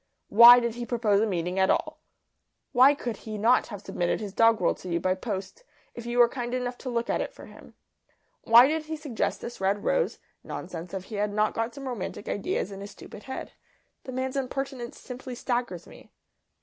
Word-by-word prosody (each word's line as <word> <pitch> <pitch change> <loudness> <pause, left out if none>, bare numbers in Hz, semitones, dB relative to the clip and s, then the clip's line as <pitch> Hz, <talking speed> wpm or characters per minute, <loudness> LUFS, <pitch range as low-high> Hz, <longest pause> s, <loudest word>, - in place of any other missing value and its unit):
Why 235 +3 +10
did 235 -1 -2
he 240 +1 -5
propose 215 -4 +2
a 225 - +2
meeting 180 -1 -2
at 190 - +3
all? - - 0 0.7
Why 265 +3 +6
could 240 -6 -4
he 215 -1 -7
not 230 +5 +3
have 205 -3 -8
submitted 175 -3 -1
his 205 -3 -6
doggerel 225 -5 +4
to 185 - -9
you 170 0 0
by 185 +2 +1
post, 195 - -6 0.3
if 235 0 -8
you 240 0 -2
were 240 -1 +7
kind 240 0 -4
enough 250 -1 -3
to 260 - -6
look 235 -1 -1
at - - 0
it - - -4
for - - -13
him? - - -15 0.7
Why 235 +3 +8
did 310 +1 -1
he 315 +1 -4
suggest 295 -7 -3
this 235 -4 -8
red 200 +2 0
rose - - +1 0.3
nonsense 175 +1 -7
if 190 - -4
he 210 +2 -7
had 205 0 0
not 215 +1 +1
got 230 +2 -3
some 275 -1 -7
romantic 220 -4 -5
ideas 200 0 -2
in 195 0 -8
his 200 - -7
stupid 210 - -12
head? 265 - -6 0.5
The 260 - -6
man's 260 +1 -3
impertinence 270 -2 -4
simply 250 0 -8
staggers 240 -8 -3
me." - - -15
235 Hz, 205 wpm, -27 LUFS, 200-250 Hz, 0.7 s, Why